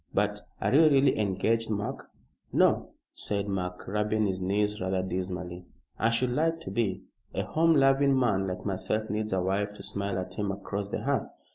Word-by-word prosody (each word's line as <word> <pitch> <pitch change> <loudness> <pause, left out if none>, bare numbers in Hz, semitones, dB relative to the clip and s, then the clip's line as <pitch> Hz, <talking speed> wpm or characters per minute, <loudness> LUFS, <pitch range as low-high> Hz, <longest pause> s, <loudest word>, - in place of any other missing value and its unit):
But - - +1 0.2
are - - 0
you 155 +4 +7
really 135 -4 +4
engaged, 110 +3 +1
Mark?" 105 -1 -3 0.4
"No," - - +3 0.2
said 100 -1 -3
Mark, 90 -2 -3
rubbing 105 +2 +1
his 95 -2 -1
knees 105 +2 0
rather 95 0 0
dismally. 90 -1 -4 0.3
"I 115 - +3
should 125 +2 +1
like 165 +5 +1
to - - -6
be. 105 -6 -1 0.3
A - - 0
home 165 0 +3
loving 135 0 +4
man 100 -6 +2
like 90 0 -5
myself 105 +2 -1
needs 110 0 -2
a 95 -1 +1
wife 100 +2 0
to - - -10
smile 100 -1 -3
at 95 0 -4
him 100 0 -1
across 100 0 -4
the - - -3
hearth." - - 0
105 Hz, 180 wpm, -28 LUFS, 95-115 Hz, 0.4 s, you